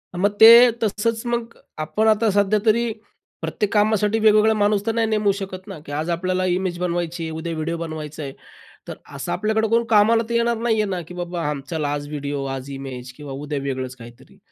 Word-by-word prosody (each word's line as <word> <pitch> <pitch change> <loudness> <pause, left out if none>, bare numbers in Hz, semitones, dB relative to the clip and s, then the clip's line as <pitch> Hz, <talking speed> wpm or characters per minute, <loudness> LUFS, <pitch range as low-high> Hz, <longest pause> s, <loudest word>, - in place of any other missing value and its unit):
मग 200 +3 +1
ते 220 +1 +11 0.3
तसंच, 225 +2 -1
मग 235 -1 -2 0.2
आपण 175 +8 0
आता 220 +1 +3
सध्या 205 +1 +2
तरी 230 +1 +2 0.5
प्रत्येक 210 0 -2
कामासाठी 210 +1 +2
वेगवेगळा 215 0 +5
माणूस 205 -1 +1
तर 225 - +1
नाही 225 -1 +1
नेमू 210 -2 +2
शकत 190 0 -7
ना? 190 -5 -8
की - - -9
आज 155 +4 -3
आपल्याला 185 +2 -1
इमेज 180 -1 -1
बनवायची 175 -1 -2
आहे, 160 - -4
उद्या 160 +1 -4
व्हिडिओ 160 +1 -3
बनवायचा 155 -2 -6
आहे. 135 - -6 0.5
तर - - -6 0.2
असं - - -5
आपल्याकडं 220 +1 0
कोण 230 +1 +3
कामाला 225 +1 +4
तर - - -2
येणार 235 0 +1
नाही 230 0 +1
आहे - - 0
ना. 185 -2 -2
की 180 - -10
बाबा 175 -3 -3 0.2
चला 155 -3 -2
आज 145 0 -4
व्हिडिओ, 145 -1 -4
आज 135 0 -5
इमेज 130 -2 -7
किंवा 145 -2 -9
उद्या 145 +1 -4
वेगळंच 130 -2 -4
काहीतरी. 120 -1 -15
185 Hz, 200 wpm, -22 LUFS, 155-215 Hz, 0.5 s, ते